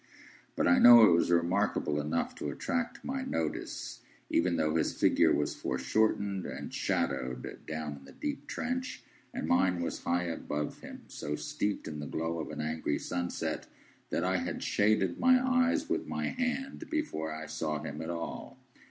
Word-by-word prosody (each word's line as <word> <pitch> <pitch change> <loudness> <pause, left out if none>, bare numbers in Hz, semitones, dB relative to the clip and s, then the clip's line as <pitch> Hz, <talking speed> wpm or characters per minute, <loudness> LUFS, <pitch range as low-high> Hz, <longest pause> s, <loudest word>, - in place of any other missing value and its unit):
But - - +2
I 90 - +6
know 120 -1 +10
it 105 - +6
was 85 - +3
remarkable 85 -3 +2
enough 75 +3 -1
to 75 - -3
attract 250 - -3
my 265 +1 -2
notice, 80 - -3 0.3
even 85 0 +2
though 75 0 +1
his 80 - +1
figure - - +5
was 75 - +1
foreshortened 100 +5 0
and - - -6
shadowed, 65 -1 -2
down 80 -2 -4
in 70 - -15
the - - -13
deep 290 -1 -5
trench, 255 +1 -3 0.3
and - - -4
mine 90 -2 +3
was - - -3
high 90 +1 +1
above 75 -3 -3
him, - - -10
so 75 0 -4
steeped 100 +6 -2
in 75 -1 -5
the 75 - -5
glow 80 +1 -2
of 80 - -4
an - - -4
angry 80 -1 -1
sunset, 90 0 -3 0.4
that - - 0
I - - +2
had - - -3
shaded 100 -4 +2
my 255 0 +6
eyes 260 +3 +2
with - - -1
my - - -2
hand 265 +5 -3
before 300 - -2
I 80 0 -5
saw 75 0 -2
him 75 -1 -5
at 80 - -5
all. 85 -1 -5
85 Hz, 170 wpm, -31 LUFS, -, 0.4 s, know